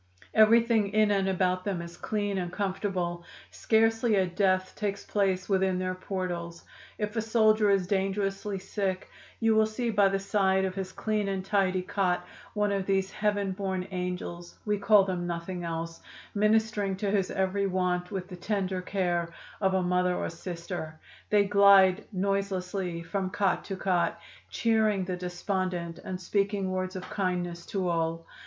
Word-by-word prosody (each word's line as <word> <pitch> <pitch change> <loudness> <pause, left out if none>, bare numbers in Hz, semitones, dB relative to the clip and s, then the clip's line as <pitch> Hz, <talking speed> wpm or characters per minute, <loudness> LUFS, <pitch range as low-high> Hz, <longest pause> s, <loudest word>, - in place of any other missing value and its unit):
Everything 225 0 +5
in 215 -1 +4
and 195 -1 +2
about 185 -1 +1
them 195 -3 -2
is 170 0 -8
clean 205 -2 -2
and 175 -1 -3
comfortable; 185 -3 -2 0.3
scarcely 225 0 +2
a 190 -1 +3
death 185 0 +1
takes 205 -1 -3
place 190 -3 0
within 190 -2 +2
their 185 0 -1
portals. 180 -2 -4 0.3
If 210 +1 -3
a 225 - +1
soldier 215 -1 +3
is 195 -2 +3
dangerously 195 +1 -1
sick 190 -1 -3 0.3
you 225 -1 +3
will 220 0 +4
see 230 +2 -2
by 205 -2 +4
the 195 - 0
side 195 -1 +2
of 190 - -2
his 190 -1 -4
clean 215 -1 -1
and 190 -1 -2
tidy 190 -2 +1
cot 185 -2 0 0.3
one 210 -1 +1
of 195 -1 -1
these 195 -1 +1
heaven 205 -2 0
born 190 -1 -3
'angels' 180 -1 -5
(we 210 -1 0
call 205 0 +6
them 180 -2 -2
nothing 175 +1 -4
else), 165 0 -4 0.3
ministering 210 -1 +2
to 195 +1 -2
his 195 -2 +1
every 195 +1 0
want 180 -1 0
with 190 -3 -4
the 185 - -8
tender 190 -1 -1
care 175 -3 -1 0.3
of 190 -1 +2
a 185 - +2
mother 180 0 +1
or - - -2
sister. 170 -2 -6 0.3
They 205 -1 +5
glide 200 -1 +6
noiselessly 190 -3 -2
from 190 +3 -2
cot 200 -1 0
to 195 - -4
cot 185 -2 0 0.3
cheering 220 -4 +2
the 180 0 -2
despondent 180 -1 -3
and 185 -1 -5
speaking 195 +1 0
words 185 0 -2
of 185 - -5
kindness 175 -3 -2
to 195 -4 -1
all. 165 -1 -1
190 Hz, 160 wpm, -28 LUFS, 180-205 Hz, 0.3 s, call